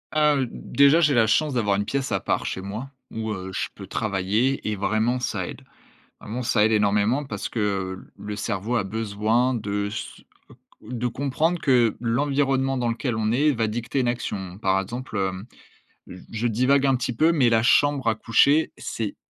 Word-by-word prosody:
Heu, 150 -3 +3
d - - -10 0.3
déjà, 140 +4 +6
j'ai 150 -3 +4
la 120 -3 +4
chance 150 +5 +2
d'avoir 105 -5 +1
une 100 - -1
pièce 135 +4 -2
à - - +1
part, - - -1
chez - - -3
moi, 110 +8 -6 0.2
où, 110 -1 -4
heu, 95 -1 -5
je - - -2
peux - - -10
travailler 110 +6 0
et 105 - -1
vraiment 110 +5 0
ça - - -2
aide. - - -9 0.6
Vraiment, 115 +4 -5
ça 115 -2 +3
aide 110 - +2
énormément 105 +6 +2
parce 135 - -4
que 95 -4 -2 0.2
le 105 +1 -6
cerveau 105 +3 -2
a 100 - 0
besoin 110 +4 0
de 105 -2 -2
s 110 +2 -7 0.6
de 120 +2 -3
comprendre 145 +7 -1
que 120 -5 +3
l'environnement 135 +2 +1
dans 120 -1 0
lequel 115 0 -2
on 110 0 0
est 145 +5 +3
va 115 -3 0
dicter 120 +4 -2
une 125 - +1
action. 95 -6 -3
Par 95 -2 +2
exemple, 120 +3 -7
heu, 95 0 -2 0.9
je 115 +2 -1
divague 130 +5 +2
un 135 -1 +3
petit 125 0 -2
peu, 160 +6 +4
mais 135 -7 +3
la 115 -1 +3
chambre 140 +1 +3
à 110 - +3
coucher, 140 +7 +3
c'est 110 -3 -4
115 Hz, 185 wpm, -24 LUFS, 105-135 Hz, 0.9 s, déjà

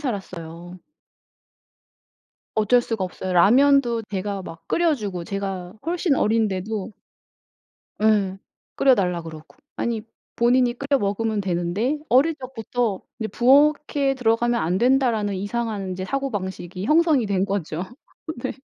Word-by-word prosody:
살았어요. 175 - -6 1.8
어쩔 220 +3 +4
수가 225 -5 -2
없어요. 185 0 -5
라면도 240 +5 +4
제가 200 0 -3
막 165 -2 -10
끓여 335 -2 +2
주고 195 -8 -5
제가 195 -1 -4
훨씬 340 -2 +1
어린데도. 215 -2 0 1.1
네. 205 -3 +2 0.4
끓여달라 190 -10 +2
그러고. 160 +4 -11 0.2
아니 230 -2 -2 0.3
본인이 245 +1 +3
끓여 275 +2 0
먹으면 210 0 -1
되는데 190 - -1
어릴 280 +7 +4
적부터 245 -5 -3 0.2
이제 220 - -2
'부엌에 280 +2 +3
들어가면 240 -1 +1
안 175 +3 0
된다.'라는 240 -5 +2
이상한 205 -1 -3
사고방식이 190 -5 -4
형성이 305 -3 +3
된 195 -2 +1
거죠. 185 -4 -3 0.6
네. 260 - -2
215 Hz, 270 characters per minute, -23 LUFS, 190-255 Hz, 1.8 s, 어쩔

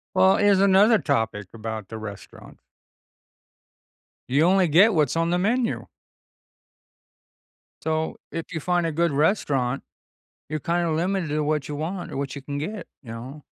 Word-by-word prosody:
Well, 190 +1 +5
here's 205 -1 +4
another 200 +3 +5
topic 110 - -1
about 110 -2 -6
the 110 - -6
restaurant. 105 -3 -10 1.7
You 140 +5 +3
only 185 +1 +4
get 190 +9 +5
what's 150 -3 +1
on 165 0 +1
the 175 - +1
menu. 230 +5 0 1.9
So, 160 0 -2
if 165 - -4
you 160 - -2
find 175 +2 0
a - - -1
good 170 +2 +1
restaurant, 140 - +1 0.7
you're 155 - -2
kind 170 +3 0
of 160 - 0
limited 180 0 -1
to 150 +1 0
what 150 -1 -1
you 150 - -5
want 175 +5 -4
or - - -5
what 140 0 -3
you 140 - -7
can 140 +1 -5
get. 175 +5 -5 0.2
You 115 - -9
know 130 +6 -8
160 Hz, 160 wpm, -24 LUFS, 140-185 Hz, 1.9 s, Well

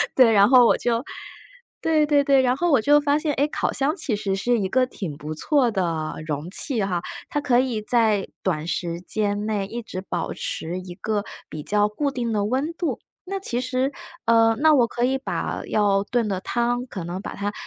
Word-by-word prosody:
对， 250 -4 +6
然 205 +1 +5
后 250 -2 +7
我 - - +5
就 235 +1 0 0.8
对 315 -2 +3
对 290 -1 +3
对， 275 -1 +4
然 255 +1 +1
后 345 0 +1
我 255 -6 +4
就 290 +4 +5
发 290 +1 +1
现， 305 -1 -1
诶， 285 +2 +2
烤 - - -1
箱 290 +5 0
其 260 - -2
实 200 -2 -2
是 240 +5 +1
一 190 - 0
个 255 +2 +3
挺 180 - -6
不 155 +1 -6
错 265 - +2
的 165 -5 -2
容 150 +2 -4
器 230 -4 +2
哈， 180 -3 -1 0.3
它 295 - -1
可 255 -4 +2
以 245 -5 -1
在 215 -3 +2 0.2
短 160 -4 -1
时 170 -1 -3
间 205 +1 0
内 205 -3 -1
一 235 +3 -5
直 185 -4 -6
保 195 - -4
持 175 +3 -4
一 180 -1 -9
个 205 +1 -2 0.2
比 155 - -7
较 210 0 +2
固 280 +7 -2
定 240 -4 -2
的 205 -1 0
温 270 +8 -1
度。 340 -1 -3 0.3
那 390 - -1
其 245 -9 -2
实， 255 +2 -1 0.3
呃， 225 0 +4
那 310 0 +5
我 245 -5 +4
可 240 - -3
以 260 +2 +2
把 270 - -3
要 200 -2 +2
炖 235 -1 0
的 190 -2 -2
汤， 240 +3 -1
可 185 - -6
能 175 +3 -5
把 - - -7
它， 205 +1 -3
230 Hz, 230 characters per minute, -23 LUFS, 195-265 Hz, 0.8 s, 后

